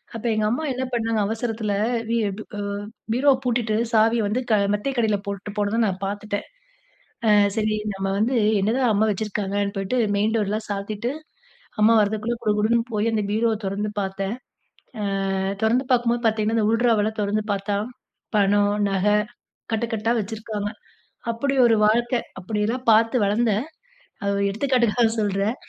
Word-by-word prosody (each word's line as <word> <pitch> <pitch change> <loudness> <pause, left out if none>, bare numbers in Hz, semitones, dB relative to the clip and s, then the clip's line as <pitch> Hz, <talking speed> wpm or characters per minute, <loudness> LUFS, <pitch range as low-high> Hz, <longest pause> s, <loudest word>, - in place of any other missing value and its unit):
அப்போ 230 +1 -3
எங்க 215 0 +1
அம்மா 255 +8 -1
என்ன 255 - -3
பண்ணாங்க 225 -2 0
அவசரத்துல, 220 -2 -2 0.4
வி 235 - +1
அ - - -4 0.8
பீரோவ 275 +3 +4
பூட்டிட்டு 235 -3 0 0.2
சாவிய 225 +1 +4
வந்து 240 +5 0
அ - - +3 0.2
மெத்தைக்கு 240 +4 -1
அடியில 215 -2 +2
போட்டு 200 +1 -5
போனது 205 +2 0
நான் 190 0 -3
பார்த்துட்டன். 205 +1 -3 0.8
அ - - +5 0.3
"சரி 215 0 +1 0.2
நம்ம 195 0 -3
வந்து 225 +5 +1 0.3
என்னதான் 230 +4 +2
அம்மா 210 +2 +3
வச்சிருக்காங்கன்னு" 200 0 -2
போயிட்டு 195 +6 -1 0.2
மெயின் 210 +2 +1
டோர்லாம் 215 0 -1
சாத்திட்டு 205 +4 -3 0.7
அம்மா 225 +2 +6
வரதுக்குள்ள 215 +3 0
குடு 210 -2 +2
குடுன்னு 230 +2 +2
போய் 215 +2 +1
அந்த 215 - +1
பீரோவ 225 +1 +2
தொறந்து 205 +2 -2
பார்த்தன். 195 +2 -3 1.0
ஆ. - - -1 0.3
தொறந்து 245 +4 +2
பார்க்கும்போது 240 -1 +2
பார்த்தீங்கன்னா 220 0 +1
இந்த 215 - +2
உள்ட்ராவுல 225 -2 +2
தொறந்து 210 +1 0
பார்த்தா 200 +1 -2 0.6
பணம், 205 0 +3 0.2
நகை 195 +2 +2 0.6
கட்டுக்கட்டா 225 0 -1
வச்சிருக்காங்க. 210 0 -4 0.6
அப்படி 275 +5 -1
ஒரு 225 -1 +4
வாழ்க்கை. 240 +3 +2 0.2
அப்படியெல்லாம் 215 +6 -2
பார்த்து 225 +3 +4
வளர்ந்தேன். 215 +2 +1 0.6
அ - - -3
ஒரு 200 - 0
எடுத்துக்காட்டுக்காக 235 0 +2
சொல்றன். 205 +2 0
215 Hz, 140 wpm, -23 LUFS, 205-230 Hz, 1.0 s, அம்மா